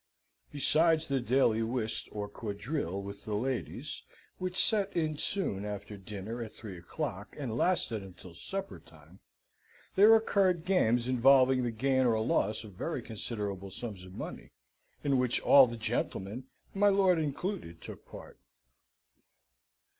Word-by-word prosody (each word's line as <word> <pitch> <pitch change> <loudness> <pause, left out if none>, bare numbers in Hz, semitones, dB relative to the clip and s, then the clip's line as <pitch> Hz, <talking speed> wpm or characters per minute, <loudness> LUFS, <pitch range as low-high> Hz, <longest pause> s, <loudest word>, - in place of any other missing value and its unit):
Besides 155 +2 +3
the 140 -1 +1
daily 120 -2 +2
whist 115 -1 -2
or 105 -1 -4
quadrille 105 - -4
with 100 0 -8
the 105 - -3
ladies, 130 +4 -3 0.4
which 185 0 -3
set 205 -2 +2
in 155 -2 0
soon 165 - -2
after 105 0 -6
dinner 105 +4 -6
at 110 -2 -6
three 100 -6 -9
o'clock, 95 +3 -5
and 130 -7 -3
lasted 120 - +1
until 90 -2 -12
supper 195 - -6
time, - - -19 0.8
there 210 +3 +8
occurred 190 -6 +2
games 125 -11 +2
involving 130 +1 +5
the 120 - 0
gain 130 +3 +2
or 110 -2 +2
loss 110 0 0
of 105 -3 -11
very 130 - -4
considerable 100 -3 -5
sums 100 -1 -7
of 90 0 -12
money, - - -7 0.5
in 140 -3 +2
which 125 -1 +1
all 135 -2 +8
the 120 0 -6
gentlemen, 110 +1 -3 0.3
my 205 +1 +4
lord 190 -3 +4
included, 150 - -3
took - - -10
part. - - -12
120 Hz, 140 wpm, -31 LUFS, 105-155 Hz, 0.8 s, there